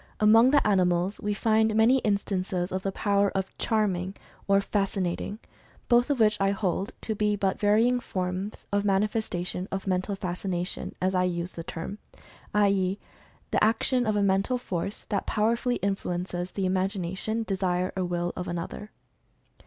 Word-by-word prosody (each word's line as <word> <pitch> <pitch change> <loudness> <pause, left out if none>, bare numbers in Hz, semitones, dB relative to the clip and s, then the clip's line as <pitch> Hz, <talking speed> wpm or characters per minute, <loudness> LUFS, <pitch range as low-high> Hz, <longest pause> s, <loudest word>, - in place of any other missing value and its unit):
Among 225 +3 +6
the 285 +1 +4
animals 185 -1 +2
we 205 0 -1
find 220 0 +2
many 230 +4 +5
instances 190 -4 -1
of 185 0 -2
the 195 - -2
power 200 0 +2
of 190 0 -3
"charming" 195 -4 0 0.3
or 195 0 +5
"fascinating," 195 -1 -1 0.5
both 240 +1 +4
of 285 -3 +1
which 210 -2 +3
I 195 - +3
hold 195 +2 -1
to 220 - -2
be 210 0 +1
but 195 -2 -1
varying 225 +4 +3
forms 185 -1 -4
of 205 0 +2
manifestation 195 -3 0
of 195 0 -3
Mental 185 +1 0
Fascination 180 -1 -3
as 185 +1 +1
I 180 -1 +2
use 175 0 -2
the 165 - -7
term, 170 +6 -6 0.5
i. 205 -1 +4
e., 190 0 0 0.5
"The - - +2
action 230 +3 +2
of 215 - +1
a 205 - +2
Mental 195 +6 +2
Force 195 -4 -4
that 200 -2 -1
powerfully 235 +3 +1
influences 180 -3 -3
the 195 - -1
imag 190 +2 0
ination, 205 +6 -2
desire, 185 -2 -1
or 190 - -1
will 175 0 -2
of 180 - -4
another." 175 +4 -5
195 Hz, 160 wpm, -27 LUFS, 185-215 Hz, 0.5 s, Among